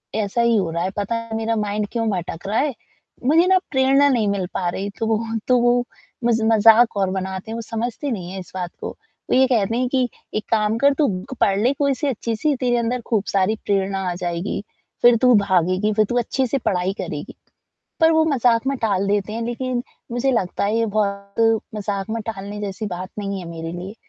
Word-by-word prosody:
ऐसा 215 +2 0
ही 235 -1 +3
हो 180 -4 0
रहा 170 +1 -1
है, 190 - 0
पता 205 +3 -1
है, 230 -1 -4
मेरा 225 0 0
माइंड 210 -1 -1
क्यों 230 -2 -1
भटक 175 -1 -4
रहा 215 - +1
है, 285 -2 +1 0.5
मुझे 325 +5 +5
ना 375 0 +5
प्रेरणा 270 +1 +4
नहीं 230 -6 +2
मिल 200 -2 0
पा 180 - -1
रही, 195 +3 -3
तो 225 - 0
वो 220 -1 +2 0.3
तो 250 -1 +5
वो 245 0 +3 0.4
मज़ 230 -1 +2
मज़ाक 225 +1 +5
और 195 -1 +1
बनाते 190 +2 -4
हैं, - - -3
वो 230 - -4
समझते 235 +5 -3
नहीं 180 -5 -4
हैं 190 - -5
इस 180 - -10
बात 180 -2 -3
को, - - -3 0.4
वो - - +3
ये 260 +1 +5
कहते 230 -2 +1
हैं 250 0 +1
कि, 255 -2 +1 0.3
"एक 215 - -1
काम 215 0 +2
कर, 280 +3 +4
तू 295 -3 +3
बुक 190 +6 -4
पढ़ 195 0 +3
ले 250 +6 +3
कोई-सी 280 +1 0
अच्छी-सी, 245 +3 -1
तेरे 245 -1 +1
अंदर 235 +1 -1
खूब 215 -4 +1
सारी 195 +2 +1
प्रेरणा 195 -1 0
आ - - -2
जाएगी, 175 +3 -2 0.4
फिर 240 -1 +7
तू 250 -1 +6
भागेगी, 190 +1 +2
फिर 215 0 +3
तू 245 - 0
अच्छे 260 +3 0
से 275 - 0
पढ़ाई 190 -5 0
करेगी।" - - -6 0.7
पर 325 0 +6
वो 320 0 +4
मज़ाक 250 -4 +2
में 275 -1 0
टाल 200 -3 +1
देते 205 +1 0
हैं, 230 - -3
लेकिन 245 +1 -2 0.3
मुझे 245 +3 +1
लगता 190 -7 -1
है, 215 +3 +1
ये 230 - +2
बहुत 210 +1 +1 0.2
मज़ाक 200 -1 -3
में 230 0 -2
टालने 205 -1 -5
जैसी 205 +1 -4
बात 185 0 -5
नहीं 200 -1 -3
है, 175 - -8
मेरे 165 0 -6
लिए, 185 +5 -7
220 Hz, 220 wpm, -21 LUFS, 195-245 Hz, 0.7 s, फिर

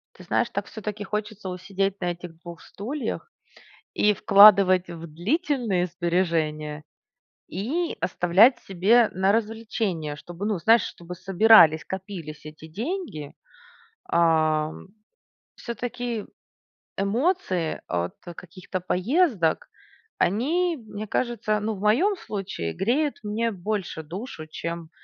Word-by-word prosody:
Ты - - -13
знаешь, - - 0
так - - -3
всё-таки 210 -1 -6
хочется 210 -1 -4
усидеть 195 +2 -2
на 175 0 0
этих 175 -1 -9
2 170 -1 -10
стульях: 255 - -5 0.6
и 210 - +3
вкладывать 195 -3 +7
в 170 -1 -8
длительные 215 - 0
сбережения, 165 -4 -1 0.7
и 290 - -2
оставлять 180 +7 +4
себе 210 +5 +3
на 190 +2 +2
развлечения, 215 -8 -2
чтобы, 175 +6 -8
ну, 210 -4 0
знаешь, 225 +6 +5
чтобы 175 +1 -8
собирались, 185 -3 +6
копились 180 -6 -7
эти 155 +1 -10
деньги. 215 - -5 0.8
А. 155 -2 +2 0.8
Всё-таки 240 -2 -4 0.7
эмоции 200 - 0
от 85 0 -2 0.2
каких-то 185 +1 -7
поездок- 185 - +1 0.5
они, 320 - +1
мне 215 -3 -8
кажется, 225 -1 -1
ну, 220 +1 -1
в - - -10
моем 260 - +3
случае 195 - -5
греют 275 +8 0
мне 220 +2 -1
больше 190 -4 -4
душу, 165 0 -7
чем 170 +1 -6
195 Hz, 110 wpm, -25 LUFS, 170-225 Hz, 0.8 s, вкладывать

